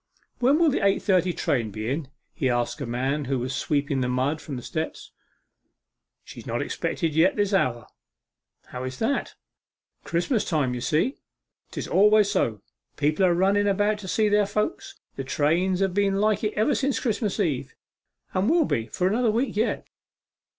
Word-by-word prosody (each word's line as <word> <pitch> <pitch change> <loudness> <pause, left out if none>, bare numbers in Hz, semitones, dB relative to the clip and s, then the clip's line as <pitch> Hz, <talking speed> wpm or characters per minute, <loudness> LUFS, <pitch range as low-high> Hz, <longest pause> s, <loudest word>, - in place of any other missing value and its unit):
'When 265 +4 +4
will 330 -2 +4
the - - -1
eight 195 0 +2
thirty 185 -3 +2
train 120 -8 -1
be 110 +1 -5
in?' 140 +3 -2 0.3
he 135 -7 0
asked 120 +4 -1
of 135 - -3
a - - -5
man 135 +4 -1
who 135 +1 -1
was 125 +2 -3
sweeping 140 -1 0
the 125 - 0
mud 130 +5 0
from 140 - -6
the 125 - -6
steps. 160 +3 -5 1.1
'She - - -11
is - - -11
not - - -2
expected 165 -5 -2
yet 165 +5 +3
this 205 -1 0
hour.' 120 - +1 0.8
'How 125 0 -6
is 130 0 -5
that?' 235 +5 -1 0.7
'Christmas 190 +7 0
time, 145 -7 0
you 125 - -4
see, 160 - 0 0.5
'tis - - -5
always 210 +1 +4
so. 110 - 0 0.3
People 150 +6 +1
are 175 - +3
running 200 +3 +2
about 205 +1 +1
to 195 - -8
see 215 +3 +2
their 205 -1 +3
friends. 320 - -2 0.2
The 135 - -3
trains 170 +8 +1
have 195 -2 +1
been 200 0 +2
like 210 +1 +1
it 210 0 0
ever 220 +8 +2
since 275 0 0
Christmas 215 -4 -1
Eve, 155 -10 -1 0.6
and 185 +5 +1
will 330 0 +4
be 115 - -1
for 180 - -2
another 230 +4 +2
week 235 +4 0
yet. 220 +3 0
185 Hz, 185 wpm, -25 LUFS, 135-210 Hz, 1.1 s, When